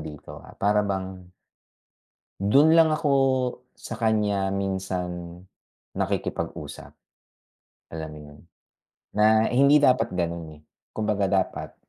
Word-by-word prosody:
dito, 75 -2 -10
ah, - - -15
para 105 +1 +2
bang 95 -2 -5 1.2
do'n 145 +7 +6
lang 160 -1 +5
ako, 150 -2 -1 0.6
sa 115 - -8
kanya 105 -4 +1
minsan, 90 -3 -4 0.6
nakikipag-usap. - - -4 1.0
Alam 80 -1 -6
mo 75 - -10
yun? 75 - -16 0.8
Na 110 +1 +4
hindi 140 +4 +5
dapat 125 -6 +3
gano'n, 85 -3 -3
eh. - - -29 0.3
Kumbaga 105 -2 0
dapat 95 -1 -2
95 Hz, 105 wpm, -25 LUFS, 90-110 Hz, 1.2 s, do'n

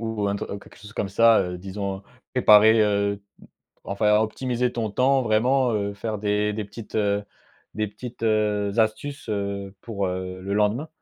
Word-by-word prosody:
ou 110 -3 -2
un 100 - -1
tru - - -5
quelque - - -17
chose 105 +1 -12
comme 105 - -2
ça, 115 +3 +5
heu, 90 -1 -3
disons, 95 +1 -5 0.3
préparer, 110 -2 +6
heu, 100 -1 +2
m - - -12 0.7
enfin, 105 +1 +2
optimiser 125 +2 -1
ton 115 -3 -3
temps 130 +4 +3
vraiment, 120 +3 +2
heu, 100 -1 -1
faire 110 +1 -4
des 105 0 0
des 105 -1 -4
petites, 105 +1 -11
heu, 105 -1 +1 0.5
des 110 0 -1
petites, 115 +4 -10
heu, 105 -2 +1
astuces, 120 +5 -1
heu, 100 -1 -3
pour, 100 -4 -3
heu, 90 0 -4
le 100 +1 -3
lendemain? 105 +8 +1
105 Hz, 175 wpm, -24 LUFS, 100-115 Hz, 0.7 s, préparer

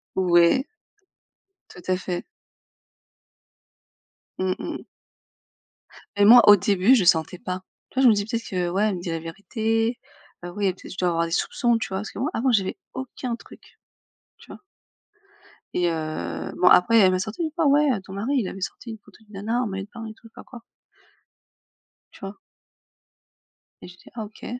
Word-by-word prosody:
Ouais. 180 - +4 1.0
Tout 180 - -13
à 185 - +2
fait. 180 -1 -4 2.2
Mmh 185 0 0
mmh. - - -6 1.3
Et 205 0 +4
moi, 240 +3 +10
au 205 - +10
début, 200 +5 +3
je 215 - +2
sentais 175 +1 +2
pas. 185 0 -5 0.3
Tu - - -25
vois? - - +4
Je 250 - +8
me - - +6
dis: 205 -1 -1
«Peut-être 230 +1 -4
que 180 -2 -1
ouais, 190 +4 0
elle 205 - -1
me 175 - -6
dit 175 - -5
la 165 0 -2
vérité, 225 +7 -2 0.5
heu, 175 - -6
oui 205 - -1
et 185 - +1
peut-être, - - -13
je - - -14
dois 180 - +1
avoir 170 0 0
des 165 - -7
soupçons». 235 +6 +1
Tu - - -4
vois? 190 0 -3
Parce 210 - -7
que - - -9
moi 290 - 0
avant 255 +3 +1
j'avais 195 -5 0 0.2
aucun 255 -2 -5
truc, - - -17 0.6
tu - - -18
vois? - - -12 1.1
Et, 175 -1 +1
heu, 85 - -4
bon, 180 - +5
après 225 +5 +6
elle 190 -2 +6
m'a 185 - 0
sorti 215 - -4
une 315 - -2
fois: 330 -3 +1
«Ouais, 290 +1 +4
heu, 205 - -2
ton 190 - -12
mari, 225 +9 -2
il 210 -7 0
avait 195 - -8
sorti 230 - -6
une 220 - -8
photo - - -20
d'une 210 - -20
nana 220 +5 -2
en 240 - -1
maillot 195 0 -5
de - - -28
bain 230 -2 -8
et 220 - -8
tout». 220 - -29
Je - - -19
sais - - -48
pas - - -12
quoi. 240 -3 -12 1.5
Tu - - -17
vois? 195 +1 -8 1.4
Et - - -10
j'ai 180 0 -14
dit: - - -17
«Ah 220 -2 -4
OK». 210 - -13
200 Hz, 200 wpm, -24 LUFS, 180-230 Hz, 2.2 s, moi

